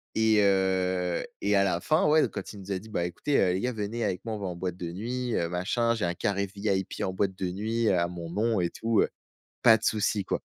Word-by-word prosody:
Et 110 -1 +4
heu 95 -2 +1 0.2
et 100 0 +2
à 100 - +5
la 90 -3 +1
fin 155 - +2
ouais 155 +1 +5
donc - - 0
quand - - -6
il 100 - -10
nous 95 +1 -8
a 95 - -1
dit: 110 +3 -13
«Bah 85 -5 -1
écoutez, 135 - -1
heu, 90 -2 +3
les 95 - 0
gars, 125 +1 0
venez 110 +1 -3
avec 90 - -2
moi, 115 - -3
on - - -6
va 100 - -3
en 90 - -4
boîte 90 0 -3
de 85 -2 -5
nuit, 120 +5 -3
heu, 85 - 0
machin, 115 +7 0
j'ai 110 - -1
un 85 - 0
carré 100 +2 -1
VIP 100 -1 -2
en 95 - -1
boîte 95 0 0
de 90 -2 -2
nuit, 110 +4 -1
heu, 95 - +4
à 85 0 +2
mon 85 -2 -7
nom 110 +3 +1
et 85 - +1
tout», 115 -1 +1
heu, - - +1 0.5
pas 115 -2 +8
de 110 - -15
souci 105 -1 +1
quoi. - - -2
100 Hz, 275 wpm, -28 LUFS, 90-110 Hz, 0.5 s, pas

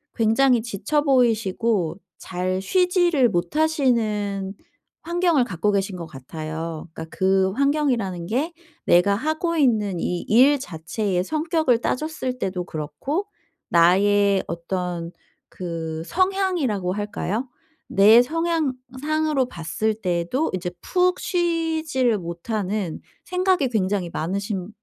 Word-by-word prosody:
굉장히 235 +2 +3
지쳐 235 +7 -1
보이시고 225 - +1 0.2
잘 185 +1 -2
쉬지를 350 - +3
못하시는 210 - 0 0.5
환경을 340 -4 +2
갖고 200 0 0
계신 195 -1 -1
것 170 - -6
같아요. 155 +4 -6
그러니까 160 0 -9
그 190 0 +3
환경이라는 250 - 0
게 275 - -1 0.3
내가 180 +3 +4
하고 315 - -1
있는 215 - +2
이 175 +1 -2
일 270 +6 +5
자체의 180 - -2
성격을 315 - +1
따졌을 260 -3 -2
때도 185 -4 -2
그렇고 160 - -3 0.4
나의 195 +3 +4
어떤 170 0 -4 0.4
그 165 -3 -5
성향이라고 355 - 0
할까요? 210 +4 -3 0.4
내 215 +4 +7
성향상으로 300 -1 -1
봤을 175 +4 -2
때도 185 - -1
이제 180 -1 -4
푹 365 0 +1
쉬지를 320 - 0
못하는 185 +1 -3 0.2
생각이 365 -5 +1
굉장히 195 -5 0
많으신 195 +3 -3
215 Hz, 245 characters per minute, -23 LUFS, 180-295 Hz, 0.5 s, 내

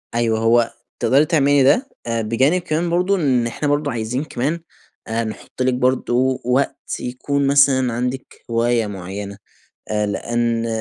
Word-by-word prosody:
أيوه، 115 -2 +1
هو 115 +1 +3 0.3
تقدري 140 +3 +4
تعملي 145 -4 +3
ده، 200 - +3 0.2
آآ، 115 -1 0
بجانب 130 +11 +2
كمان 170 0 -1
برضه 180 +3 +2
إن 130 -9 +1
إحنا 145 +5 -3
برضه 145 0 0
عايزين 120 +4 -2
كمان 155 +4 -2 0.5
آآ 115 +1 -1
نحُط 110 +3 -7
لِك 130 0 +2
برضه 130 0 +1
وقت 130 +3 0 0.2
يكون 140 +3 -2
مثلًا 135 -3 +4
عندِك 125 +2 -4
هواية 115 -1 +1
معيَّنة، 100 +1 -6 0.5
آآ، 105 -1 0
لأن 115 +2 -1
125 Hz, 145 wpm, -20 LUFS, 115-140 Hz, 0.5 s, تقدري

